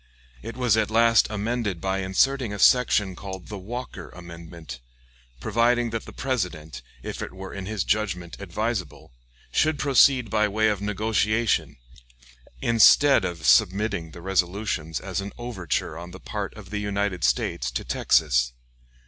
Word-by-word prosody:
It 115 - -8
was 120 -4 +2
at 110 -1 +1
last 115 0 +4
amended 105 -2 -2
by 95 +2 -1
inserting 115 +6 +1
a 105 - -4
section 105 -5 +3
called 95 -2 -8
the 105 - -6
Walker 100 -5 -7
amendment, 85 -6 -10 0.6
providing 115 - +1
that 115 -1 -4
the - - -10
President, 90 - -3 0.2
if - - -6
it - - -5
were 95 0 -9
in 95 -1 -6
his 110 -4 -2
judgment 90 -5 -2
advisable, 100 - -4 0.4
should 155 - +2
proceed 135 -5 +4
by 105 -1 +2
way 110 +2 +2
of 105 -2 -2
negotiation, 110 +2 0 0.9
instead 115 +5 +6
of 85 -3 -4
submitting 100 -2 +3
the 85 +2 -12
resolutions 90 - -1
as - - -4
an 100 +1 -7
overture 95 -10 -3
on 85 +1 -8
the 90 +1 -11
part - - -5
of - - -12
the 105 - -2
United 100 -3 -2
States 65 - 0
to - - -4
Texas. 60 -6 +2
100 Hz, 150 wpm, -25 LUFS, 90-115 Hz, 0.9 s, instead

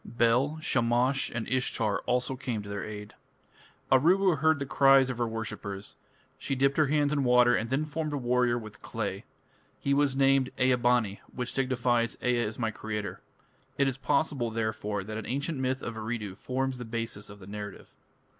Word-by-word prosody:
Bel, 120 +6 +2
Shamash, 125 0 +2
and 115 -1 -4
Ishtar 115 -4 0
also 125 +1 +1
came 125 -5 -3
to 100 - -9
their 100 -1 -4
aid. 105 -1 -7 0.8
Aruru 170 +5 +4
heard 160 +1 +4
the 140 - -3
cries 135 -1 +5
of 125 - -7
her 120 - +1
worshippers. 105 -3 -5 0.4
She 135 - -2
dipped 135 +1 +2
her 155 -2 +4
hands 145 0 +2
in 145 -2 +1
water 125 -1 +5
and 115 - -1
then 135 +4 0
formed 155 0 -3
a 145 - -1
warrior 125 -1 +2
with 110 -3 -9
clay. 105 -1 -4 0.5
He 140 - 0
was 140 -1 +2
named 135 -1 +3
Ea 130 0 +4
bani, 120 -5 +1
which 125 -1 -3
signifies 120 -3 +1
"Ea 125 0 +2
is 110 -2 -2
my 115 -2 -1
creator". 105 -4 -5 0.6
It 140 - +3
is 135 -1 -1
possible, 135 -1 0
therefore, 110 -2 -2
that 110 +2 -5
an 110 - -7
ancient 140 +3 -2
myth 130 0 -1
of 115 - -4
Eridu 110 -3 -4
forms 130 +4 -2
the 120 - -5
basis 115 -2 -4
of 105 - -11
the 95 - -13
narrative. 100 0 -8
125 Hz, 185 wpm, -29 LUFS, 110-135 Hz, 0.8 s, cries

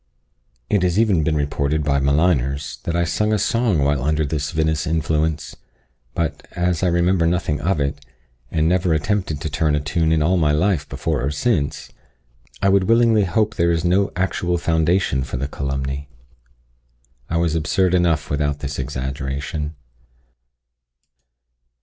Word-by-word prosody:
It 105 - +1
has 90 0 +1
even 105 -7 +3
been 75 +1 0
reported 75 +1 0
by 70 -1 +1
maligners, 70 -1 0
that 85 - -1
I 85 - +2
sung 105 +5 0
a 110 - +3
song 105 - +1
while 70 -1 +1
under 75 +3 +1
this 75 0 -2
vinous 80 -1 0
influence; 80 -1 -1 0.6
but, 80 -2 -3
as 90 -2 0
I 95 - +2
remember 85 0 +2
nothing 85 -4 0
of 85 0 0
it, 70 0 -2 0.5
and 80 -1 +1
never 90 -1 +2
attempted 90 -1 -1
to 80 - -2
turn 75 0 +1
a - - +1
tune 80 +2 0
in 80 -1 +2
all 90 +4 +2
my 75 -3 +2
life 80 -1 +1
before - - -2
or 70 - 0
since, 75 - -1 0.7
I - - +4
would 95 -1 +3
willingly 115 -2 +4
hope 105 +5 +1
there 85 -3 +2
is 85 0 0
no 95 +3 +2
actual 90 -1 0
foundation 80 -3 +1
for 60 - -5
the 70 +3 -2
calumny. 70 0 -4 1.2
I 85 - 0
was 85 -2 +1
absurd 90 +3 +1
enough 85 -5 +1
without 75 0 0
this 75 -1 -4
exaggeration. 70 +3 -4
80 Hz, 155 wpm, -21 LUFS, 75-90 Hz, 1.2 s, I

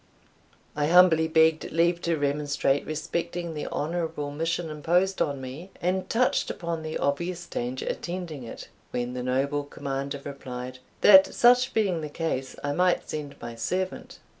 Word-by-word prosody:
I 150 -1 +1
humbly 165 -2 +6
begged 160 0 +3
leave 170 +1 +2
to 170 -1 0
remonstrate 145 -1 0
respecting 170 +2 -3
the 150 - -4
honourable 160 -2 -3
mission 165 +2 -2
imposed 175 +5 +1
on 140 -2 0
me, 135 +8 -8
and 185 +2 -1
touched 250 +2 +2
upon 170 -2 -3
the 155 0 -4
obvious 170 +5 -1
danger 125 -5 -4
attending 175 -6 -4
it, 115 - -8 0.2
when 120 0 -3
the 125 - -4
noble 135 +3 0
commander 140 0 -4
replied, 130 -2 -7 0.2
"that 190 -2 +8
such 250 +1 +5
being 195 -7 +1
the 150 - -5
case, 145 -4 -3
I 145 - 0
might 180 +4 +2
send 150 -2 -5
my 120 0 -7
servant." 185 +11 -3
155 Hz, 150 wpm, -27 LUFS, 140-175 Hz, 0.2 s, that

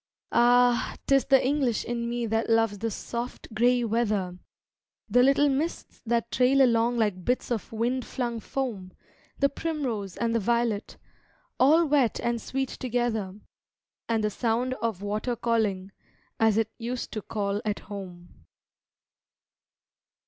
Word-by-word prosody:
Ah, 245 0 +4
'tis 275 -1 +3
the 270 -2 +4
English 265 -4 +1
in 235 0 -2
me 240 0 -2
that 225 +1 -1
loves 225 -3 +2
the 225 +2 -1
soft, 235 +2 -6
gray 245 +2 +3
weather 210 -6 -1 0.7
The 245 - +4
little 275 +3 +4
mists 290 +5 -2
that 235 0 0
trail 265 +2 +4
along 235 -1 +2
like 205 -5 0
bits 250 +3 -1
of 230 -4 -3
wind 240 +3 -1
flung 235 -1 -3
foam, 220 -8 -4 0.4
The 280 - +4
primrose 270 - -3
and 230 -1 0
the 230 - +2
violet 235 -1 -1 0.6
all 310 +6 +5
wet 280 -6 +2
and 235 -1 -1
sweet 265 +2 -2
together, 225 -6 -2 0.7
And 225 -1 +1
the 210 - +1
sound 240 +4 0
of 220 -4 -2
water 215 +4 -2
calling, 210 -5 0 0.5
as 220 -1 +3
it 225 -1 +1
used 240 +1 -4
to 215 - -4
call 205 -1 -2
at 210 -2 -1
home. 175 - -10
235 Hz, 140 wpm, -27 LUFS, 215-250 Hz, 0.7 s, all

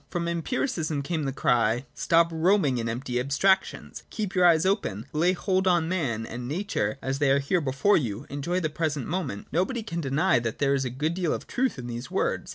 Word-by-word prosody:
From 170 -1 -2
Empiricism 165 - -1
came 155 0 -2
the 135 - -1
cry: 120 -1 +1
' - - -37
Stop 165 0 +3
roaming 160 -5 +2
in 115 0 -2
empty 125 +1 -2
abstractions, 190 +9 0
keep 210 -4 -4
your 180 -1 +5
eyes 165 -1 +4
open, 190 - 0
lay 170 +4 +3
hold 190 +1 0
on 175 -3 +3
man 135 -11 -1
and 120 +2 -6
nature 150 - -2
as 135 +1 -2
they 145 -2 +3
are 135 - +5
here 140 +6 +1
before 140 +8 +2
you, 120 -3 -3
enjoy 145 +6 -2
the 155 -4 -1
present 155 -4 -2
moment' 155 - -3
Nobody 190 - 0
can 170 -6 -4
deny 135 -2 +2
that 115 -2 -3
there 140 -1 +2
is 135 -1 0
a - - -1
good 150 +7 -2
deal 175 -3 0
of - - -7
truth 260 - -1
in 125 - -7
these 120 +1 -6
words. - - -1
155 Hz, 215 wpm, -26 LUFS, 130-180 Hz, -, your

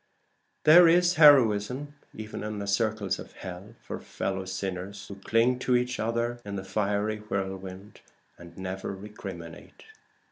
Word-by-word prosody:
There 170 +3 +8
is 175 +1 +4
heroism 135 -2 +5 0.2
even 110 0 -7
in 105 0 -4
the 100 - -4
circles 105 -1 0
of - - -10
hell 95 +4 -9
for - - -6
fellow 95 0 -4
sinners 95 +1 -5
who - - -8
cling 115 +5 +1
to 125 0 +1
each 125 0 0
other 115 +2 -1
in 100 -1 -6
the 95 - -4
fiery 105 +2 -1
whirlwind 95 -1 -6 0.3
and 85 -1 -14
never 95 +1 -5
recriminate. 95 -5 -10
105 Hz, 140 wpm, -27 LUFS, 95-115 Hz, 0.3 s, There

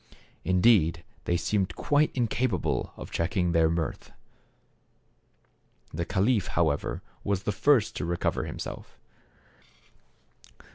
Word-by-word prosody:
Indeed 90 -4 +3 0.2
they 85 - +1
seemed 95 +2 -1
quite 145 +1 +2
incapable 120 -4 0
of - - -9
checking 90 +1 0
their 80 -1 +4
mirth. 85 0 -3 1.8
The 85 +2 -2
caliph 105 +2 +1
however 80 -4 0 0.2
was 100 -2 -1
the 105 - 0
first 115 +3 +3
to - - -2
recover 85 +1 -1
himself. - - -7
95 Hz, 100 wpm, -28 LUFS, 85-105 Hz, 1.8 s, their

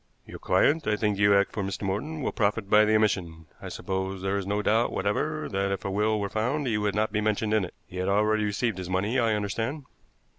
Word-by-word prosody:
"Your - - -10
client 155 +2 +2
I 105 - +2
think 105 -2 -1
you 100 0 +5
act 100 0 +2
for 105 - -3
Mr. 95 +1 -4
Morton 135 +11 -3
will - - 0
profit 105 -1 -1
by 105 0 +7
the 110 0 +3
omission. 90 -7 0 0.2
I - - -6
suppose 95 0 -4
there 95 +1 0
is 100 -1 -3
no 105 +1 -1
doubt 115 +3 +2
whatever 150 +11 -1
that, 100 0 -1
if 95 - -3
a 100 - -1
will 105 +2 +1
were 100 - -1
found, 125 +9 -1
he 110 -4 0
would 105 -2 -1
not 110 0 +1
be 105 0 0
mentioned 105 0 0
in 110 -2 +3
it. 90 - -7
He 90 - -10
had 95 +1 -1
already 105 +2 +2
received 105 0 -1
his 90 -1 -6
money, 100 +7 0
I 115 -2 +2
understand." 115 +8 -3
105 Hz, 245 wpm, -27 LUFS, 100-110 Hz, 0.2 s, by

